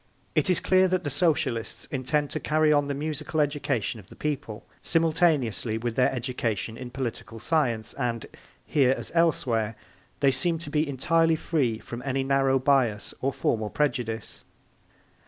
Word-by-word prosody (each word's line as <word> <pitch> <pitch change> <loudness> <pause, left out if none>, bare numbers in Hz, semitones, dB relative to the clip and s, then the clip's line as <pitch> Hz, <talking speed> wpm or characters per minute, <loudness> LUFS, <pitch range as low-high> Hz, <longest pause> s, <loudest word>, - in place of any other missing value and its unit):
It - - +2
is 180 - +4
clear 185 0 +4
that 185 -1 0
the 145 - -2
Socialists 145 -6 0
intend 140 +2 0
to - - -1
carry 155 0 +3
on 145 -1 +2
the 140 - -2
musical 150 +1 -3
education 145 -7 0
of 95 - -15
the - - -14
people 130 -7 -4 0.2
simultaneously 155 - +2
with 115 0 -3
their 125 - +3
education 120 -4 -2
in 125 +1 -7
political 115 -3 -5
science 120 -4 0
and, 120 -4 -2 0.4
here 135 -3 +3
as - - -7
elsewhere, 120 -10 +1 0.4
they 140 -1 +4
seem 170 +4 +1
to 160 -2 -7
be 150 0 +1
entirely 165 +4 +2
free 140 -8 0
from 120 +2 -8
any 135 0 -1
narrow 135 0 +3
bias 130 -6 +1
or 135 - +1
formal 110 -4 -1
prejudice. 120 -4 -2
135 Hz, 155 wpm, -26 LUFS, 115-155 Hz, 0.4 s, is